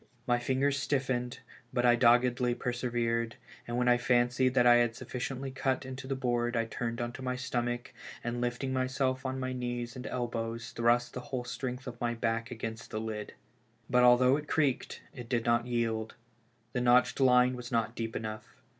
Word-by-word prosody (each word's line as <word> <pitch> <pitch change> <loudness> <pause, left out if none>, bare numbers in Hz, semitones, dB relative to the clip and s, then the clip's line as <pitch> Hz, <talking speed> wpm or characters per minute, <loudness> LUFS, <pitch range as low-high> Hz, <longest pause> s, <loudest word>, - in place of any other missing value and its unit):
My 120 -1 +2
fingers 135 +3 +1
stiffened, 130 -3 -1 0.3
but 125 -1 +1
I 120 0 +6
doggedly 120 0 +4
persevered, 120 -2 -1 0.3
and 120 0 -2
when 125 0 +1
I 120 0 +5
fancied 125 +1 +2
that 125 -2 +5
I 120 0 +8
had 120 -1 +2
sufficiently 130 +2 -5
cut 130 0 -1
into 130 0 -7
the 135 - -1
board 120 -2 0
I 115 - +1
turned 115 +1 -4
on 120 0 -3
my 130 -1 -2
stomach, 120 -1 -3 0.3
and 120 0 -2
lifting 125 +2 -2
myself 130 0 0
on 130 0 -3
my 130 0 -2
knees 120 -1 -4
and 125 0 -6
elbows 115 -1 -3
thrust 120 +1 +2
the - - -4
whole 125 -1 -4
strength 125 +1 -4
of 120 -2 -8
my 120 -1 0
back 115 0 -1
against 115 -1 -6
the 110 - -3
lid. 110 -1 -5 0.6
But 125 0 +5
although 125 +2 +6
it 150 0 -7
creaked, 140 -5 0
it 125 -3 -9
did 120 -3 0
not 120 0 +2
yield; 115 -2 -1 0.6
the 125 - 0
notched 125 +2 +4
line 125 -1 +5
was 125 0 -8
not 115 -1 0
deep 115 -1 -4
enough. 110 0 -6
120 Hz, 180 wpm, -31 LUFS, 120-130 Hz, 0.6 s, I